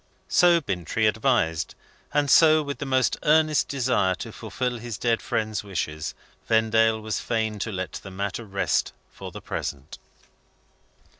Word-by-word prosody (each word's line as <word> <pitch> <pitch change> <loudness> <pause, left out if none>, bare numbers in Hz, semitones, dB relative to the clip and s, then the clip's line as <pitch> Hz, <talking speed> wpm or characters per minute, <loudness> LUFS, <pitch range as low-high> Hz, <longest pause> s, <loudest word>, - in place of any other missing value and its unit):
So 175 -1 +5
Bintrey 100 - -2
advised. 105 - +1 0.4
And 145 -1 +1
so, 155 -1 +6
with 140 -1 -5
the 140 - -4
most 130 -2 +2
earnest 155 0 +3
desire 125 -9 +1
to 115 - -7
fulfil 120 +3 -4
his 115 -2 -6
dead 115 -2 +1
friend's 110 -2 -2
wishes, 80 -6 -4 0.3
Vendale 110 0 +3
was 110 0 -3
fain 110 -2 -2
to 110 - -3
let 95 -2 -4
the 100 - -8
matter 100 +3 -4
rest 100 -2 -1 0.2
for - - -9
the - - -9
present. 70 +1 -5
110 Hz, 145 wpm, -25 LUFS, 100-130 Hz, 0.4 s, so